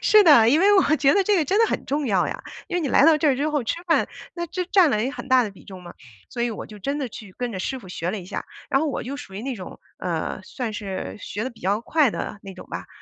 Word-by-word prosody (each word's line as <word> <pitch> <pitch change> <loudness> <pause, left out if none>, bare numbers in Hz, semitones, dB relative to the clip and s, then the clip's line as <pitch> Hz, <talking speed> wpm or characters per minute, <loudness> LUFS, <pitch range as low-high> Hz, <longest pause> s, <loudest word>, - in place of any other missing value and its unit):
是 425 -1 +7
的， 235 -8 +7
因 295 +6 +5
为 410 +1 +6
我 315 -5 +4
觉 275 -1 +4
得 400 - +4
这 415 0 +3
个 320 - +2
真 395 +9 +1
的 455 - +5
很 - - -2
重 285 0 -1
要 195 -5 +2
呀， - - -6 0.3
因 355 - -2
为 355 - +1
你 290 - -1
来 260 - +5
到 320 0 +7
这 310 - +3
儿 265 - +3
之 295 +3 0
后 295 -4 0
吃 335 +9 -3
饭， 330 - +2 0.3
那 345 -1 -3
这 360 +2 -3
占 370 -4 +5
了 215 -3 +1
一 245 - 0
个 275 - -3
很 270 - -8
大 255 -1 +5
的 215 - -3
比 195 - -17
重 185 -2 -11
嘛， 175 - -10 0.4
所 235 - -3
以 240 - 0
我 220 - -6
就 210 - -12
真 280 +9 -2
的 265 -4 -2
去 200 -3 -11
跟 245 -1 -3
着 190 - -4
师 265 +7 -3
傅 215 - -14
学 175 0 -3
了 210 - -3
一 180 - -9
下。 - - -5 0.3
然 270 - +3
后 315 - 0
我 280 - -3
就 265 +4 -5
属 195 -9 -10
于 210 - -5
那 265 0 -3
种， 190 -5 -9 0.2
呃， - - -3
算 245 -5 -5
是 200 -3 -5
学 215 +3 -4
得 260 - -3
比 235 - -19
较 200 +4 0
快 290 -1 +2
的 205 - -5
那 195 -1 -9
种 185 - -11
吧， - - -5
260 Hz, 335 characters per minute, -23 LUFS, 210-310 Hz, 0.4 s, 是